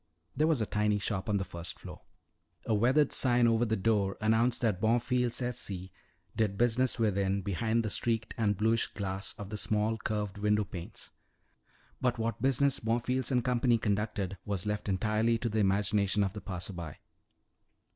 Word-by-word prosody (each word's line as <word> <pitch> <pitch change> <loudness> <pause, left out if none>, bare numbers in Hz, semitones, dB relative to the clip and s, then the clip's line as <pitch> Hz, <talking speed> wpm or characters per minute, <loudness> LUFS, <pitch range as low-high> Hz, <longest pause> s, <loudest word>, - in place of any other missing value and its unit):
There 155 - +2
was 155 -7 +2
a - - +1
tiny 105 0 +1
shop 100 -1 -2
on 105 - +2
the 95 - -1
first 85 -1 -7
floor. - - -10 0.6
A 115 - 0
weathered 130 +7 +3
sign 120 -2 +4
over 115 0 +3
the 110 -1 0
door 100 -2 +1
announced 115 +2 +2
that 105 -6 0
Bonfils 120 +2 +1
et 125 -1 -2
Cie. 95 -6 -3 0.4
did 105 -3 0
business 120 +3 +2
within, 100 -3 +1
behind 110 +5 0
the - - -1
streaked 115 0 -1
and 105 -4 +1
bluish 110 +2 +2
glass 95 -1 -4
of 105 -2 -8
the 105 - -3
small 110 +2 0
curved 105 -2 -3
window 105 +1 +2
panes. 90 -3 -8 0.9
But 125 -1 +1
what 115 -1 -2
business 135 +1 +2
Bonfils 120 +2 0
and 125 -3 +1
Company 125 -1 +3
conducted 105 -3 -2
was 100 -4 -3
left 105 0 -2
entirely 110 +4 +1
to 115 +1 -2
the 110 0 -1
imagination 100 0 +2
of 95 -1 -2
the 105 - -7
passer 95 0 -4
by. 85 -4 -7
110 Hz, 175 wpm, -31 LUFS, 100-115 Hz, 0.9 s, sign